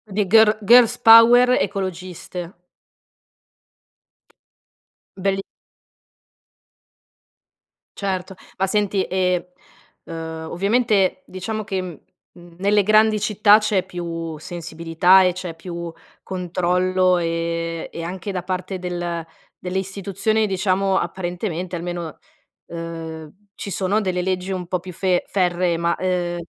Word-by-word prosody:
Di 210 -1 +2
girl 220 +1 +5
girl's 235 +2 +6
power 235 +2 +7
ecologiste. 185 -2 -5 2.6
Belli. 195 0 -1 2.6
Certo 190 -1 -3 0.2
ma 190 - +1
senti 200 -1 +1
e, 180 -1 -1 0.5
uhm, 160 0 -6
ovviamente, 200 -2 +1
diciamo 215 +4 -5
che, 195 -2 -3
mhmm, 175 0 -13
nelle 205 +2 +3
grandi 215 +1 +4
città 210 0 +5
c'è 210 -4 0
più 165 -3 -5
sensibilità 170 +3 +2
e 180 - +2
c'è 180 -2 -6
più 170 0 -7 0.3
controllo 185 0 +1
e 165 0 -2
e 170 - -6
anche 185 +3 -5
da 180 -2 -4
parte 185 0 -4
del 175 -2 -4 0.4
delle 180 +1 -3
istituzioni, 200 +3 -1
diciamo, 190 0 +1
apparentemente 180 -1 -3
almeno, 175 -1 -5 0.5
uhm, 165 -2 -7 0.3
ci 200 - -6
sono 195 +3 0
delle 185 -3 -1
leggi 185 +1 -2
un 180 -2 -5
po' 185 +1 -1
più 180 +1 -10
fe 180 0 0
ferree, 180 -2 +1
ma, 170 0 0
uhm, 180 -2 -1
185 Hz, 110 wpm, -21 LUFS, 175-195 Hz, 2.6 s, power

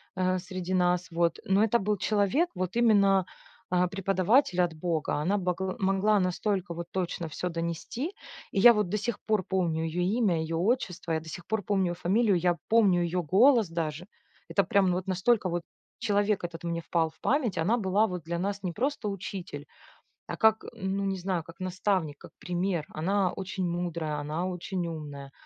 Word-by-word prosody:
э, 185 0 +1
среди 185 0 -5
нас, 180 -1 +1
вот. 170 0 +1
Но 195 +2 +3
это 225 +1 +3
был 210 0 0
человек 210 - +1
вот 185 +2 -3
именно, 200 -5 +4 0.4
а, 180 0 +2
преподаватель 195 +2 +2
от 175 -2 +1
бога. 160 -1 -1
Она 195 +7 +1
богл 185 0 -2
могла 195 +2 +2
настолько 185 0 -1
вот 170 0 -6
точно 175 -2 -2
всё 175 +4 -4
донести, 170 - -4 0.4
и 195 - 0
я 235 +4 +9
вот 210 -4 0
до 210 - 0
сих 215 +1 -3
пор 215 -4 +1
помню 170 -4 0
ее 165 +2 -1 0.2
имя 195 -8 +2
и - - -1
ее 165 +1 -3
отчество, 185 -3 -1
я 160 - +1
до 160 0 -11
сих 170 +2 -8
пор 220 -2 -1
помню 195 -2 +1
её 175 - -2
фамилию, 195 +3 +2
я 175 0 +1
помню 205 -6 +4
ее 175 +1 -1
голос 220 - +5
даже. 165 +1 -3 0.4
Это 200 - +2
прям 190 0 +3
вот 185 +1 -3
настолько 190 +2 +2
вот 175 0 -2 0.4
человек 205 -2 +1
этот 170 -1 -6
мне 170 0 -2
впал 165 -1 0
в - - -25
память. 250 - +1
Она 190 +9 +2
была 205 0 +2
вот 180 -4 -5
для 170 +2 -3
нас 200 +2 -3
не 180 - -1
просто 250 - -1
учитель, 185 -6 -6 0.6
а - - -5
как, 220 -1 +3
м, 190 -1 -3
ну, 200 - -1
не 195 -1 -1
знаю, 180 -2 -2
как 165 +2 -14
наставник, 185 -4 -1
как - - -13
пример. 175 -2 -2
Она 185 +3 0
очень 190 -1 -3
мудрая, 170 -3 -2
она 150 +4 -3
очень 180 0 -3
умная, 145 -4 -7
185 Hz, 190 wpm, -28 LUFS, 170-200 Hz, 0.6 s, я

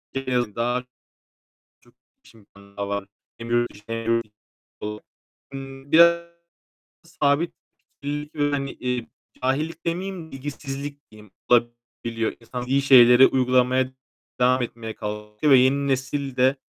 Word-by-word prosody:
En 135 -1 -2
azından 120 +2 -1 1.0
çok - - -25 0.3
iş - - -19
imkânı 100 -2 -19
var. 100 0 -3 0.3
Hem 115 0 -8
yurt 120 0 +2
içinde 115 +3 -6
hem 115 0 +3
yurt 115 - -1 0.6
dışında. 105 0 -6 0.9
Biraz 170 +1 +6 0.8
sabit 155 0 0 0.5
fikirlilik 150 +2 -4
ve, 145 -1 +1
hani, 140 -1 -2
eee, 125 -2 -3 0.4
cahillik 155 +6 -1
demeyeyim, 175 -1 -4
bilgisizlik 140 +1 -7
diyeyim, 105 -2 -16 0.2
olabiliyor. 120 -1 0
İnsan 125 +1 -6
bildiği 135 +3 +1
şeyleri 125 -1 +8
uygulamaya 130 0 +2 0.5
devam 125 +1 +4
etmeye 115 -2 -5
kalkıyor 105 +6 -2
ve 130 - +9
yeni 140 +2 +3
nesil 135 0 -2
de 130 +2 +3
130 Hz, 120 wpm, -24 LUFS, 115-140 Hz, 1.0 s, ve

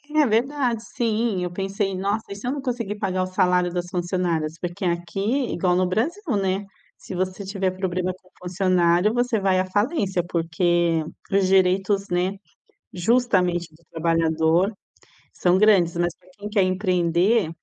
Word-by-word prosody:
É 305 -1 +5
verdade, 245 0 0
sim, 225 -5 -1
eu 180 - -3
pensei: 195 +1 -2
"Nossa, 200 +4 -1
e - - -4
se 210 +5 -7
eu - - +1
não 285 0 -3
conseguir 235 -5 -3
pagar 185 -2 -1
o - - -3
salário 180 -1 +2
das 175 0 -3
funcionárias?" 175 -3 -1
Porque 175 +1 -5
aqui, 175 +2 -2 0.3
igual 180 0 +1
no 185 0 +2
Brasil, 285 - -1
né, 195 0 -1 0.3
se - - -9
você 185 +2 -3
tiver 195 -1 -1
problema 185 -1 -2
com 185 0 -22
funcionário 180 +1 +2
você 245 -2 +1
vai 190 -1 +2
à 185 - +1
falência, 200 - 0
porque 170 -1 +1 0.3
os 195 -1 +3
direitos, 195 +1 +2
né, 180 +2 +1 0.6
justamente, 180 -4 +1
do 165 +2 -23
trabalhador 165 +3 +2 0.6
são 180 +1 +2
grandes. 190 -5 +4
Mas 175 0 0
para 185 0 -25
quem 205 - -6
quer 210 -1 +2
empreender, 185 +1 +2
185 Hz, 155 wpm, -23 LUFS, 175-205 Hz, 0.6 s, É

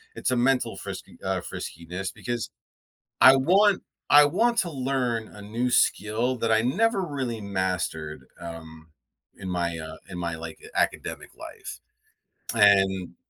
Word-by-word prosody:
it's - - -1
a - - +2
mental 125 +1 +1
frisky - - -8
uh, - - -1
friskiness 90 +4 -6
because 120 -2 -4 0.7
I 130 +1 +9
want 190 +8 +4 0.3
I 145 0 +9
want 235 +10 +1
to 180 -6 +1
learn 125 -5 -1
a 105 - -13
new 115 +5 -2
skill 115 +2 +2
that 115 -1 0
I 110 - +5
never 200 - +2
really 135 -9 -3
mastered, 90 -6 -3
um, 80 -1 -9 0.5
in 95 - -7
my, 85 -2 -1
uh 80 0 -7
in 90 - -6
my, 85 -1 -2
like, 80 0 -8 0.2
academic - - -1
life. - - -9 0.7
And 95 -4 +4
110 Hz, 140 wpm, -26 LUFS, 90-130 Hz, 0.7 s, I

